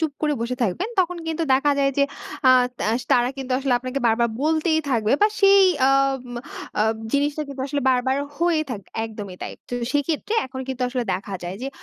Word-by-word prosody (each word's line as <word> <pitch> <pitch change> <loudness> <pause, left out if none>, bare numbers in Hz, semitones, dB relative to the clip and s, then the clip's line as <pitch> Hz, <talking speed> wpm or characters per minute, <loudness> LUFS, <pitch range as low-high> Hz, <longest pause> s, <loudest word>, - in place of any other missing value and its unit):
চুপ 315 -3 0
করে 300 -1 +2
বসে 245 +2 -2
থাকবেন 235 - -1
তখন 360 -1 -1
কিন্তু 325 +1 -2
দেখা 290 +2 +2
যায় 275 0 +3
যে 280 - +5 0.4
আ - - +9 0.3
তা - - -1 0.3
তারা 245 0 +4
কিন্তু 260 -1 -4
আসলে 270 -2 0
আপনাকে 255 +2 -4
বারবার 235 +1 +3
বলতেই 315 +1 +2
থাকবে 225 -2 +1
বা 425 - +6
সেই 395 0 +7 0.2
আম 270 -1 +2 0.6
আব 220 +1 +2 0.2
জিনিসটা 290 +2 +1
কিন্তু 270 -1 -5
আসলে 285 +1 -2
বারবার 260 +1 +1 0.2
হয়ে 340 -2 +2
থাক 210 -4 -4 0.2
একদমই 205 -4 -7
তাই। - - -5 0.2
তো 245 - -4 0.2
সেক্ষেত্রে 300 +9 -1
এখন 260 0 -7
কিন্তু 260 -1 -3
আসলে 250 -1 -2
দেখা 195 0 -5
যায় 175 +2 -5
যে 270 - -2
270 Hz, 195 wpm, -23 LUFS, 245-305 Hz, 0.6 s, আ